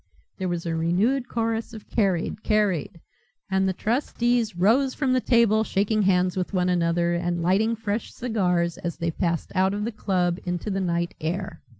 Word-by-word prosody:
There 185 -1 -1
was 175 -1 -3
a 165 - -1
renewed 200 +11 +1
chorus 225 0 -2
of 215 - -11
"Carried, 195 -3 0
carried," 205 -8 0 0.5
and 190 0 +2
the - - 0
trustees 240 0 0
rose 240 +9 +3
from 265 -3 +1
the 255 - +2
table 230 -3 +3
shaking 210 +1 +1
hands 185 -2 +2
with 185 +1 -3
one 180 0 +2
another, 170 -1 +1
and 175 0 -1
lighting 210 +6 +2
fresh 220 0 -3
cigars 180 -8 0
as 170 -2 -4
they 170 0 -1
passed 170 0 -2
out 190 +1 +2
of 210 0 -2
the 235 - -2
club 180 -4 0
into 180 +3 -3
the 195 0 -1
night 170 -1 -1
air. 175 +5 -3
190 Hz, 180 wpm, -25 LUFS, 175-220 Hz, 0.5 s, rose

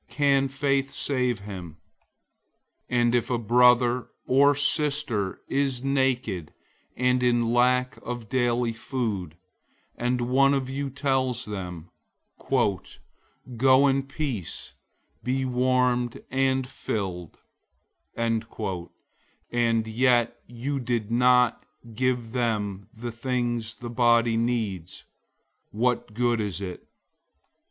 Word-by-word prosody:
Can 140 -2 +2
faith 135 0 0
save 125 -6 0
him? 90 -6 -8 1.1
002:015 125 - 0
And 120 0 +3
if 120 +1 +1
a 125 - +1
brother 125 +1 +4 0.2
or 140 +2 +4
sister 140 - 0
is 135 -3 0
naked 130 - 0 0.5
and 125 0 +2
in 120 -1 +2
lack 125 +1 +2
of 120 -2 -6
daily 120 -2 +1
food, 110 - -3 0.6
002:016 120 - -1
and 125 0 +1
one 135 +3 +3
of 130 -1 -2
you 140 +1 -3
tells 130 -2 -1
them, 90 -5 -7 0.6
"Go 130 - 0
in 135 0 +2
peace, 135 - -5 0.5
be 130 +1 0
warmed 125 -1 +1
and 130 0 +1
filled;" 95 - -4 0.8
and 115 +1 -3
yet 120 +1 +2
you 130 +4 -3
didn't 120 +1 +3 0.4
give 125 -1 -1
them 105 -5 -2
the 120 +1 -6
things 120 -2 -2
the 120 - -8
body 120 -1 +3
needs, 110 -7 -2 0.6
what 115 -1 -1
good 120 -1 +1
is 100 -3 -3
it? 95 -3 -7
120 Hz, 105 wpm, -26 LUFS, 115-130 Hz, 1.1 s, brother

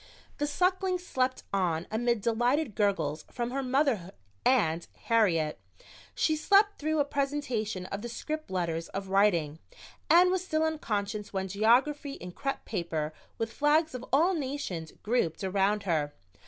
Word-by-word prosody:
The 295 - +1
Suckling 370 +4 +1
slept 260 -7 -1
on 175 -4 +1
amid 235 0 +1
delighted 240 +4 +1
gurgles 195 -8 0
from 240 -1 -3
her 275 +1 -1
mother 255 - +1 0.3
and 170 -10 +2 0.2
Harriet. 175 -10 +2 0.6
She 315 - +2
slept 405 +6 +4
through 310 +1 0
a 290 - +3
presentation 275 -9 -2
of 200 +2 -5
the 240 - -5
script 310 +6 -5
letters 170 -3 -2
of 195 0 -5
"Writing" 175 -6 +2 0.5
and 360 +2 +7
was 370 -1 0
still 315 -4 0
unconscious 210 -10 -2
when 190 0 -1
"Geography" 250 +9 +2
in 180 -7 -8
crepe 275 +9 -4
paper, 165 -6 -2 0.2
with 225 0 -3
flags 305 +2 +2
of 250 -1 -5
all 330 +8 +4
nations, 265 - -4
grouped 205 -7 0
around 195 +2 +1
her. 155 -6 0
230 Hz, 145 wpm, -29 LUFS, 190-290 Hz, 0.6 s, and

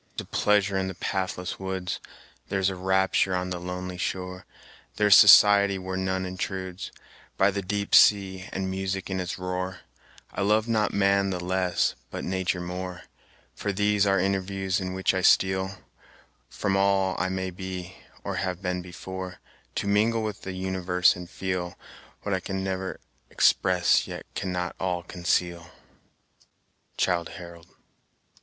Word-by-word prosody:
"There - - -2
is - - -15
a - - -11
pleasure 100 -2 +3
in 95 - -1
the 95 - -5
pathless 95 -1 -3
woods, 95 -1 -3 0.5
There 100 - -1
is 95 0 +2
a - - -5
rapture 95 0 +2
on 90 0 -2
the 90 - -3
lonely 90 0 -5
shore. 90 0 -4 0.5
There 105 - +1
is 105 -1 +8
society 100 -1 +8
where 95 0 -5
none 95 0 -1
intrudes, 95 0 -5 0.5
By 95 +1 +4
the 100 0 -2
deep 100 +2 -3
sea, 95 -2 +5
and 95 0 -3
music 95 0 -3
in 95 - -1
its 90 -1 -3
roar: 90 0 -4 0.5
I - - -3
love 105 +3 +2
not 110 -2 +1
man 100 0 +2
the 90 -2 -2
less, 90 0 0 0.2
but - - -6
nature 95 0 -1
more, 90 0 -5 0.5
From 100 -1 -3
these 105 0 +2
our 95 -1 +3
interviews, 95 0 -1
in 95 0 -4
which 95 +1 +1
I 95 - 0
steal 95 +1 +3 0.7
From 100 -2 -1
all 95 -1 +2
I 95 - 0
may 95 0 -3
be, 90 0 -7 0.3
or - - -3
have 90 -2 -2
been 90 -2 -2
before, 90 +1 -7 0.4
To - - -2
mingle 110 +3 +2
with 105 -2 -4
the 95 - -6
universe, 95 -1 +2
and 90 -1 -9
feel 90 -2 -3 0.5
What 100 - -1
I 95 - +1
can 95 +1 -4
ne'er 95 -1 -3 0.3
express, 90 -1 +3
yet - - -7
cannot 90 -2 -3
all 90 -2 -1
conceal" 85 -1 -1 1.3
Childe 85 -2 +1
Harold. 85 -2 -11
95 Hz, 160 wpm, -26 LUFS, 90-95 Hz, 1.3 s, is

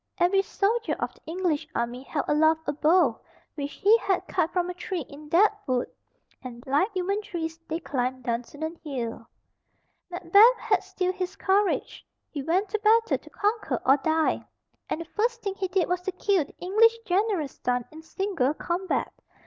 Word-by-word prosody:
Every 370 +2 +3
soldier 430 +4 0
of - - -3
the - - -23
English 335 -3 -1
army 235 +2 -2
held 280 +1 -3
aloft 315 +2 +3
a - - -1
bough 305 -4 +3 0.3
which 285 -1 -5
he 420 +3 +5
had 385 -4 -1
cut 350 -3 0
from 355 -1 0
a 360 - -4
tree 360 -3 -4
in 295 +1 -12
that 395 +7 +5
wood, 255 -2 0 0.5
and 240 -2 -9
like 295 - +2
human 390 +3 -1
trees 330 -5 -5
they 320 +1 -2
climbed 255 -4 -2
Dunsinane 290 +8 -4
Hill. 235 -6 -5 0.8
Macbeth 390 +7 +5
had - - +1
still 370 -1 -2
his 370 0 -4
courage. 395 +1 0 0.3
He 290 - -4
went 365 +8 0
to 435 - -1
battle 450 +2 +3
to - - -16
conquer 430 +2 -1
or 270 +2 +6
die, 315 +2 +1 0.5
and 320 - -2
the - - -6
first 460 +7 -1
thing 395 -2 -2
he 385 -1 -3
did 365 -1 +1
was 360 0 -1
to 380 - -3
kill 370 -4 +1
the - - -20
English 455 +5 +4
general's 375 - 0
son 245 -1 0
in 315 +1 -11
single 320 -5 -1
combat. 355 +4 -2
350 Hz, 175 wpm, -26 LUFS, 295-390 Hz, 0.8 s, or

